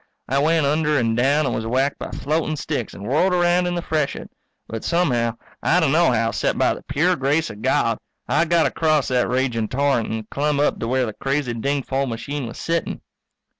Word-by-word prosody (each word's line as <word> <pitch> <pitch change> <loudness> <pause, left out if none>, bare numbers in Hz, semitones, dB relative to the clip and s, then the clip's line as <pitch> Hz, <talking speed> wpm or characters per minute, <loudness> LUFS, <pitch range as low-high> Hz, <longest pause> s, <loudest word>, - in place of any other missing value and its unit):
I 135 +2 +1
went 160 +1 +3
under 150 +1 +2
and 115 -3 +1
down, 140 +5 +2
and - - -1
was 110 0 -3
whacked 135 +4 0
by - - -5
floating 155 +1 -1
sticks 145 -5 -4
and 100 - -9
whirled 155 - +2
around 175 0 +3
in 175 - -1
the 175 - -3
freshet. 155 -3 -2 0.4
But 115 -1 -6
somehow, 125 -10 +1 0.3
I 175 - +3
d'no 160 -1 +3
how 115 -1 +1
except - - -1
by - - +3
the - - -9
pure 155 +6 +1
grace 150 +3 0
of 105 0 -11
God, - - +1 0.3
I 170 - +2
got 170 0 +3
across 155 -3 +1
that 125 -2 +1
raging 125 -3 0
torrent 135 -3 +1
and 110 -1 -4
clumb 145 0 0
up 145 - +1
to 115 - -3
where 130 +1 +1
the 110 - -5
crazy 135 -1 -1
dingfol 135 +2 -1
machine 125 +4 -4
was 115 - -8
sitting. 165 0 -2
140 Hz, 205 wpm, -22 LUFS, 120-155 Hz, 0.4 s, went